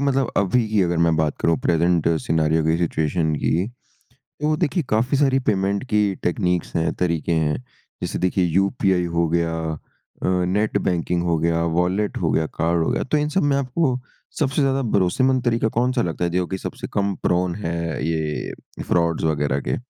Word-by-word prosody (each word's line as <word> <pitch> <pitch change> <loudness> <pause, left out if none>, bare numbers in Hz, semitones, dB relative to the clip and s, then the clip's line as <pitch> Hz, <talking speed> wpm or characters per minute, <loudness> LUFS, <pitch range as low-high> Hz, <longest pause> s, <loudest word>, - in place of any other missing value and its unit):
मतलब 135 -2 +1
अभी 110 +4 +2
की 105 -1 +2
अगर 85 -1 0
मैं 85 -1 +3
बात 80 -2 0
करूँ 85 0 +2
प्रेज़ेंट 85 0 +2
सिनेरियो 80 0 +1
की, 80 +1 +2
सिचुएशन 80 -1 0
की 85 +6 0 0.8
तो 155 +1 +2
देखिए 165 +1 0
काफ़ी 120 +6 +2
सारी 135 -1 +3
पेमेंट 100 -3 0
की 105 -2 +2
टेक्नीक्स 90 -1 -1
है, 80 0 +1
तरीके 85 -2 -1
हैं। 80 -2 +1 0.5
जैसे - - -3
देखिए 90 0 +1
यूपीआई 95 +1 +1
हो 85 0 +2
गया 85 0 0 0.7
अ, - - 0 0.2
नेट 105 +3 +1
बैंकिंग 85 -1 0
हो 85 -2 +1
गया, 85 +1 +1 0.2
वॉलेट 95 +4 0
हो - - 0
गया, 80 - +1
कार्ड 85 0 0
हो - - 0
गया - - 0
तो 145 +3 0
इन 150 0 0
सब 190 +5 +1
में 145 -1 +2
आपको 130 0 0 0.4
सबसे 145 -1 +1
ज़्यादा 135 0 +2
भरोसेमंद 125 +7 +2
तरीका 115 -1 +2
कौन-सा 125 0 +1
लगता 85 -3 -2
है, - - 0
जो 90 +1 0
कि 95 - -3
सबसे - - -6
कम 100 0 +1
प्रोन 90 0 +1
है 85 -5 -3
ये 80 -2 -2 0.3
फ्रॉड्स 85 -2 +1
वग़ैरह 75 -3 +1
के? - - +1
90 Hz, 180 wpm, -22 LUFS, 85-120 Hz, 0.8 s, मैं